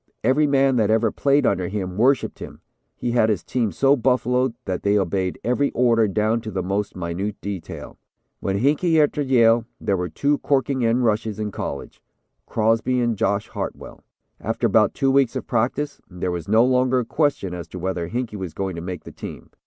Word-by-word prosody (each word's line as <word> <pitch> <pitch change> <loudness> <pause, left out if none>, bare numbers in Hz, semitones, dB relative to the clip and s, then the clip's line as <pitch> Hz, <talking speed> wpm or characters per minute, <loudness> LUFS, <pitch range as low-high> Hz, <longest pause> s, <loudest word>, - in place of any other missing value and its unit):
Every 150 +3 +3
man 135 -2 +3
that 110 -3 +2
ever 110 0 +2
played 140 +1 +2
under 90 -2 +1
him 95 -2 -4
worshipped 130 +6 +2
him. - - -9 0.3
He 120 - -3
had 115 -2 +3
his 100 -6 0
team 115 -5 -1
so 135 - +3
buffaloed 125 -1 +1
that 95 -2 -2
they 100 +1 +2
obeyed 95 -1 -1
every 125 +4 +1
order, 115 -3 +3
down 110 +3 0
to 110 - -6
the 95 -3 -3
most 100 +3 -2
minute 90 +4 -4
detail. 100 -4 -7 0.4
"When 95 0 -1
Hinkey 150 - +2
entered 145 -1 +1
Yale, 115 -3 +4
there 100 - 0
were 90 -1 -2
two 140 - 0
corking 135 -2 0
end 120 +2 +2
rushes 110 -1 0
in 105 -1 -3
college, - - -6 0.5
Crosby 115 +3 +1
and 120 -2 +1
Josh 100 +2 0
Hartwell. - - -6 0.4
After - - -2
about - - +3
two 135 -1 +2
weeks 135 -3 +3
of - - -3
practice, 130 +5 -1
there 90 0 -3
was 85 -2 -5
no 110 +3 +5
longer 130 0 +2
a - - -5
question 140 - 0
as 85 -2 -6
to 90 - -9
whether 90 -1 -3
Hinkey 120 -1 -3
was 95 -5 -6
going 95 -2 -3
to - - -4
make 90 +1 -6
the - - -10
team. - - -9
115 Hz, 195 wpm, -22 LUFS, 95-130 Hz, 0.5 s, no